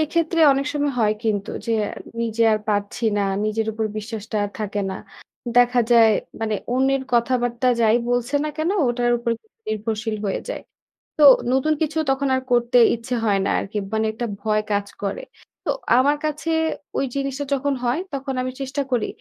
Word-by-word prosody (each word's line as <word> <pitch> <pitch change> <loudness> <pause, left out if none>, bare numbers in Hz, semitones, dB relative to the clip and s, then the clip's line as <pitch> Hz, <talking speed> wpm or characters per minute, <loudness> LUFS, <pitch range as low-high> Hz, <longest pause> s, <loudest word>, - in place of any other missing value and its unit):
এক্ষেত্রে 330 +2 0
অনেক 275 +1 -1
সময় 290 -1 0
হয় 210 -1 +3
কিন্তু 205 -3 -1 0.2
যে - - -2 0.2
আ - - -6 0.3
নিজে 230 0 0
আর 215 - +2
পারছি 205 +2 -1
না। 205 - +1 0.2
নিজের 215 +1 -1
উপর 220 +1 -2
বিশ্বাসটা 215 0 -5
আর 205 - -4
থাকে 210 -1 -2
না। - - -4 0.6
দেখা 245 0 +5
যায় 230 -2 +7 0.3
মানে 220 -1 -1 0.2
অন্যের 265 +1 +2
কথাবার্তা 240 +1 +1
যাই 225 +1 +4
বলছে 245 +3 0
না - - -1
কেন 315 +3 0 0.2
ওটার 240 0 +1
উপর 235 0 -2 0.4
নির্ভরশীল 215 +1 -2
হয়ে 195 - -1
যায়। - - -4 0.6
তো 305 - +4 0.3
নতুন 265 +4 +2
কিছু 315 0 -1
তখন 270 +1 +1
আর 260 - -1
করতে 240 0 +3 0.2
ইচ্ছে 235 +2 -4
হয় 200 -2 +2
না - - 0
আরকি। 205 +2 -5 0.2
মানে 220 0 +1
একটা 240 +2 -3 0.2
ভয় 215 -1 +1
কাজ 200 0 0 0.2
করে। 200 0 -2 0.4
তো - - -2 0.3
আমার 285 +3 +3
কাছে 305 +2 -3 0.5
ঐ - - +2 0.2
জিনিসটা 275 +1 -2
যখন 280 +1 0
হয় 245 +5 +1
তখন 275 0 -3
আমি 255 0 -3
চেষ্টা 270 +1 -2
করি 240 -4 +1
240 Hz, 180 wpm, -22 LUFS, 220-270 Hz, 0.6 s, যায়